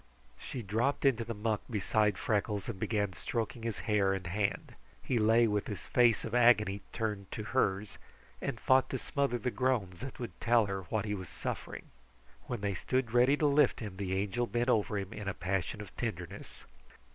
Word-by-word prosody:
She 125 - -6
dropped 115 +9 0
into 120 -4 +3
the 115 0 -5
muck 105 0 -1
beside 105 -2 +1
Freckles 105 -2 -1
and 95 - -5
began 105 -3 0
stroking 115 +4 -3
his 115 -2 -3
hair 100 -3 +3
and 95 -2 -4
hand. 100 +2 -1 0.3
He 125 - 0
lay 115 +2 +5
with 105 -2 0
his 105 - -5
face 120 -3 +3
of 115 - -5
agony 105 -5 +4
turned 105 -4 -3
to 110 - -4
hers, 100 -5 0 0.4
and - - -3
fought 130 0 +4
to 130 - -2
smother 140 -1 -1
the 125 +2 -2
groans 120 -10 0
that 135 0 -7
would 120 - -7
tell 120 -2 +4
her 95 -1 -3
what 110 +2 -1
he 105 - -2
was 95 -4 -5
suffering. - - -5 0.6
When 120 -4 -3
they 100 -1 0
stood 125 +5 -1
ready 125 +4 +5
to 150 - +1
lift 145 +1 +4
him, 105 -4 -6
the 95 -1 -2
Angel 105 +5 0
bent 120 +2 0
over 105 -3 +2
him 100 +2 -4
in 105 -3 -6
a 100 - -2
passion 95 +2 -2
of 105 - -11
tenderness. 95 -4 -6
110 Hz, 190 wpm, -32 LUFS, 100-120 Hz, 0.6 s, lay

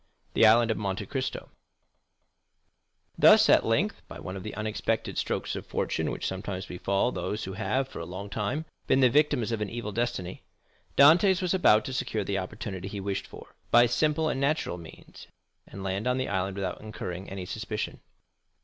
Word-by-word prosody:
The 110 - +6
Island 115 +1 +5
of - - -1
Monte 100 0 -3
Cristo 130 +4 -4 1.7
Thus, - - +7
at - - +6
length, - - 0
by - - -9
one 95 - -6
of 95 - -6
the 105 - -7
unexpected 105 0 -2
strokes - - -2
of - - -5
fortune - - -1
which - - -4
sometimes 95 -1 -4
befall 100 +6 0
those 105 -2 -3
who 95 - -5
have 130 +7 -1
for - - -9
a 85 - -5
long 95 +3 -6
time 105 +10 -2 0.2
been 135 - +4
the 125 -2 +5
victims 125 -5 +2
of 115 -2 -2
an 105 - -2
evil 115 -2 -5
destiny, 100 -5 -3 0.6
Dantès 175 +6 +6
was 180 -2 0
about 110 - +4
to 130 - -4
secure 125 -4 -1
the 100 0 -1
opportunity 95 0 -6
he 100 0 -5
wished 100 0 -3
for, - - -13 0.2
by 120 +1 +7
simple 150 +6 +1
and 135 -3 -1
natural 140 - 0
means, 80 -2 -13 0.4
and 95 - -9
land 95 +4 -2
on 125 0 +2
the 130 - -1
island 95 0 -1
without 95 -2 -4
incurring 95 -4 -6
any 95 -1 -6
suspicion. - - -4
105 Hz, 185 wpm, -28 LUFS, 95-125 Hz, 1.7 s, Thus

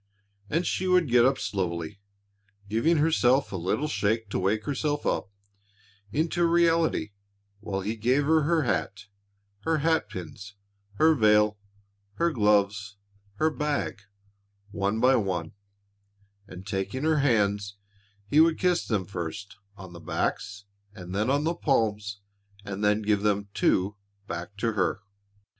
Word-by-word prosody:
And 165 +4 0
she 185 - -1
would 180 -5 +3
get 120 0 +6
up 135 - +1
slowly, 90 -1 -3 0.7
giving 115 +11 +2
herself 140 -4 +2
a - - -4
little 95 - -1
shake 110 -5 -1
to - - -1
wake 105 +3 0
herself 145 +1 -2
up - - -1 0.8
into 165 +3 +1
reality 165 -9 +2 0.5
while 100 -2 -4
he 105 +4 -3
gave 125 +6 +1
her 160 +1 +4
her 160 +1 +2
hat, 100 -2 -2 0.6
her 160 +8 0
hat 160 +2 +1
pins, 95 +3 -9 0.4
her 160 +8 +5
veil, 105 -4 +3 0.6
her 170 0 +1
gloves, 105 -3 +1 0.4
her 155 +8 +1
bag, 150 -8 -2 0.7
one 100 +2 -1
by 130 +3 +5
one, 90 -6 -2 0.9
and 95 0 -10
taking 95 +7 -3
her 160 -1 +2
hands, 100 -6 +1 0.5
he 145 - +3
would 160 0 +5
kiss 180 -1 +1
them 105 -5 -1
first 90 +2 -6 0.2
on 95 -2 -11
the 85 - -10
backs 105 +4 -3 0.3
and 90 -2 -8
then 105 +5 0
on 140 +2 +2
the 165 +2 0
palms 105 -9 -1 0.4
and 100 0 -5
then 105 +1 +2
give 105 -1 +1
them 100 -1 0
too 100 +3 +1 0.3
back 90 +1 -7
to 115 +2 0
her. 90 -3 0
105 Hz, 140 wpm, -27 LUFS, 100-150 Hz, 0.9 s, get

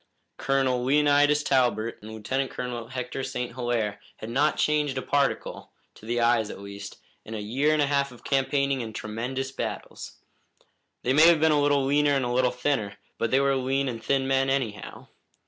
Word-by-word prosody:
Colonel 130 -2 +1
Leonidas 145 +2 +3
Talbot 120 -5 +1
and 105 - -10
Lieutenant 130 +5 -2
Colonel 120 -2 -5
Hector 125 +1 -5
St. 125 -2 -4
Hilaire 120 -4 -2 0.2
had 110 - -7
not 145 +5 +2
changed 150 -3 +1
a - - -1
particle 140 -1 -1 0.2
to 110 - -15
the 120 +1 0
eyes, 115 -2 +2
at - - -7
least 100 0 -9 0.3
in 110 - -7
a - - -4
year 130 +9 0
and 155 -1 +3
a - - +3
half 140 -1 0
of 125 - -15
campaigning 140 0 +1
and 110 -2 -7
tremendous 125 +5 -4
battles. - - -6 0.9
They 130 - +1
may 155 +4 +7
have 170 -2 +5
been 160 0 +4
a 150 -1 +3
little 145 -1 +2
leaner 145 +1 +3
and 135 -2 0
a 120 - -2
little 125 0 +3
thinner, 125 -5 -2 0.2
but 115 - 0
they 130 - +3
were 140 0 +2
lean 135 +1 0
and 115 -3 -5
thin 135 +2 +1
men, 135 0 +2
anyhow. 120 -7 -3
130 Hz, 190 wpm, -26 LUFS, 120-140 Hz, 0.9 s, may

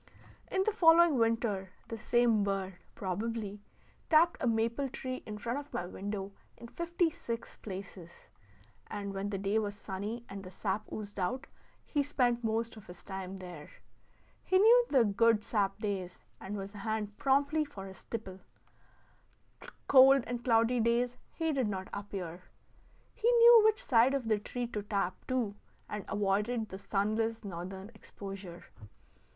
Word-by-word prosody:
In 380 0 +2
the 435 - +1
following 335 - +6
winter 225 -5 0
the 230 - -5
same 235 -2 +3
bird 195 -1 -1 0.2
(probably) 205 +2 -3 0.5
tapped 330 +1 +5
a 250 - +1
maple 235 +4 0
tree 255 0 -5
in 210 -1 -5
front 235 +6 -2
of 290 0 -11
my 175 - -3
window 195 +2 -5 0.3
in 235 - -10
fifty 340 +1 0
six 235 -5 -6
places; 185 -3 -9 0.6
and 200 -1 -5
when 195 +1 -3
the 200 - -2
day 200 +3 +1
was 205 -2 -3
sunny, 205 +4 -5
and 195 0 -8
the 185 - -8
sap 200 +2 -3
oozed 205 -1 -6
out, 245 +9 -1 0.4
he 290 - 0
spent 250 -4 +1
most 225 +1 -1
of 215 - -13
his 180 0 -12
time 190 -1 -6
there. 175 -5 -9 0.7
He 375 - +3
knew 470 +5 +7
the 260 -5 +5
good 215 +1 +3
sap 200 -4 0
days, 195 -4 -4 0.2
and 205 +2 -5
was 195 +1 -6
on 205 - -8
hand 215 -1 -3
promptly 285 +3 +2
for 200 -10 -9
his 190 -1 -11
tipple; 190 -5 -6 1.5
cold 270 -1 +7
and 240 0 -4
cloudy 230 0 +3
days 235 +2 +2 0.2
he 325 -1 -1
did 260 -5 +1
not 190 -2 -4
appear. 190 -4 -5 0.7
He 470 - +2
knew 470 -1 +9
which 435 -1 +3
side 250 +1 +4
of 255 -4 -2
the 215 -2 +2
tree 245 +4 -4
to 210 -3 -3
tap, 200 -3 -1
too, 245 -5 0 0.3
and 210 -1 -5
avoided 210 +3 0
the 190 - -7
sunless 220 +3 -1
northern 190 +3 -6
exposure. 195 -4 -9
220 Hz, 155 wpm, -32 LUFS, 195-245 Hz, 1.5 s, knew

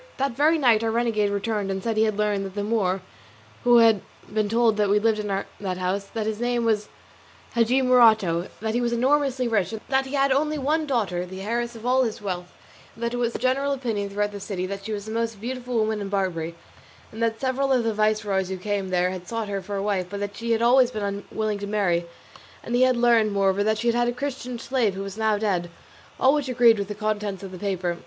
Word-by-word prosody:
That 275 +1 0
very 300 +7 +3
night 235 -7 +4
our 225 - +1
renegade 225 -3 +1
returned 205 0 -2
and 190 0 -3
said 225 -1 -1
he 220 +1 +3
had 215 -2 -1
learned 210 -2 0
that 190 - -12
the 205 - -2
Moor 195 -4 0 0.6
we 240 -1 +6
had 220 -4 +4 0.3
been 215 -1 +1
told 225 -1 +2
of 205 -1 +2
lived 215 +2 +2
in 210 - -3
that 195 -1 -4
house, 185 +2 -1
that 220 +1 -4
his 220 0 -2
name 240 -1 0
was 215 -2 +1 0.6
Hadji 240 +3 +3
Morato, 220 -9 +4
that 220 0 -1
he 240 - +1
was 235 -1 0
enormously 265 0 +1
rich, 215 -3 0
that 265 0 +1
he 275 - -4
had 275 -1 +3
one 300 +3 +1
only 305 +3 0
daughter 200 - 0
the 190 +1 -8
heiress 235 +2 -2
of 225 0 -10
all 255 +1 +3
his 230 -2 -1
wealth, 180 -3 -5 0.4
and 230 - -8
that 235 0 -1
it - - -2
was 240 -1 0
the - - -2
general 275 +3 +1
opinion 225 -7 -2
throughout 205 +1 -1
the 205 - -7
city 195 -2 -4
that 195 +1 -6
she 220 - -4
was 205 -1 -4
the 220 - -6
most 230 -2 -2
beautiful 250 +2 -5
woman 215 -1 0
in 200 - -4
Barbary, 175 -4 -2 0.6
and 220 - -8
that 225 -1 0
several 270 +1 0
of 255 -3 +3
the 225 -1 0
viceroys 210 -3 0
who 190 - -3
came 200 0 -2
there 180 0 +1
had 180 -1 -7
sought 225 -2 -3
her 200 -1 -2
for 200 +2 -6
a 195 - -2
wife, 195 -3 -1
but 200 +1 -5
that 205 0 -4
she 230 +2 -5
had 225 -1 +2
been 235 - +4
always 250 -1 +4
unwilling 205 +1 -3
to 200 - -5
marry; 180 -5 0 0.6
and 235 - -5
he 245 - +3
had 255 -1 +4
learned, 230 -3 +3
moreover, 195 0 +2
that 215 +1 +1
she 235 +2 +1
had 240 +1 +1
a - - +1
Christian 250 -1 -4
slave 235 -5 0
who 195 - -4
was 195 0 -7
now 220 -1 +1
dead; 190 -5 -1 0.5
all 265 +1 +5
which 290 -3 -1
agreed 235 -3 +5
with 200 - -2
the 210 - -5
contents 210 -2 -2
of 195 - -7
the 185 - -9
paper. 180 -3 -2
215 Hz, 240 wpm, -24 LUFS, 200-240 Hz, 0.6 s, we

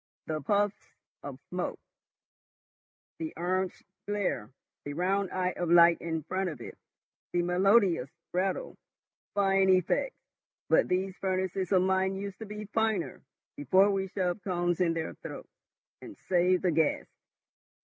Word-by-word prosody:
The 155 -1 -3
puffs 205 +6 -1 0.3
of - - -8
smoke, - - -3 1.4
the 320 -1 -5
orange 185 +2 -1 0.2
glare, 205 - -1 0.3
the 145 - -5
round 190 +4 0
eye 185 0 -1
of 175 -2 -2
light 170 0 +7
in 160 -2 -3
front 185 +4 -2
of 150 -6 -8
it, - - -9 0.6
the 175 0 +2
melodious 180 - +3 0.2
rattle. 195 - -1 0.6
Fine 195 -1 +3
effects! 185 - +2 0.5
But - - +4
these 185 +1 -1
furnaces 190 0 -1
of 185 -2 +4
mine 190 0 +1
used 200 0 -6
to 220 - -7
be 210 +1 -6
finer, 220 -5 0 0.3
before 190 +8 +4
we 195 -1 -1
shoved 185 +1 -2
cones 175 -2 0
in 165 -2 +2
their 160 -1 -3
throats, - - -9 0.5
and 320 -3 -10
saved 180 +1 +2
the 180 - +3
gas." 160 -1 +1
185 Hz, 140 wpm, -29 LUFS, 175-195 Hz, 1.4 s, light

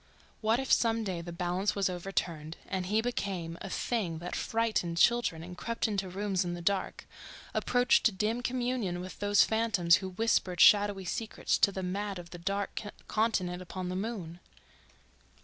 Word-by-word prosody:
What 220 +2 +2
if 265 - -3
some 230 -1 +3
day 185 -5 -3
the 170 +1 -7
balance 180 +3 -1
was 200 -2 +2
overturned, 170 -4 -3
and 185 -1 -2
he 215 +3 +2
became 190 -8 -3
a - - -5
thing 185 -7 -1
that 175 +2 -5
frightened 220 -7 0
children 235 -7 +3
and 180 +1 -8
crept 230 +5 -2
into 200 -3 -2
rooms 195 0 -1
in 175 -1 -3
the - - -7
dark, 195 +2 -1 0.5
approached 245 -4 +3
dim 220 +4 0
communion 245 -7 -1
with 185 +1 -8
those 205 0 +5
phantoms 210 -6 +3
who 190 -1 -5
whispered 185 -3 0
shadowy 205 -1 +6
secrets 220 +5 -1
to 200 - +5
the 190 -1 -4
mad 200 +2 -3
of 170 -1 -10
that 175 -1 -10
dark 200 +1 -1 0.3
continent 185 -5 0
upon 185 0 -5
the 180 - -3
moon.... 190 -5 -4
195 Hz, 165 wpm, -30 LUFS, 180-220 Hz, 0.5 s, shadowy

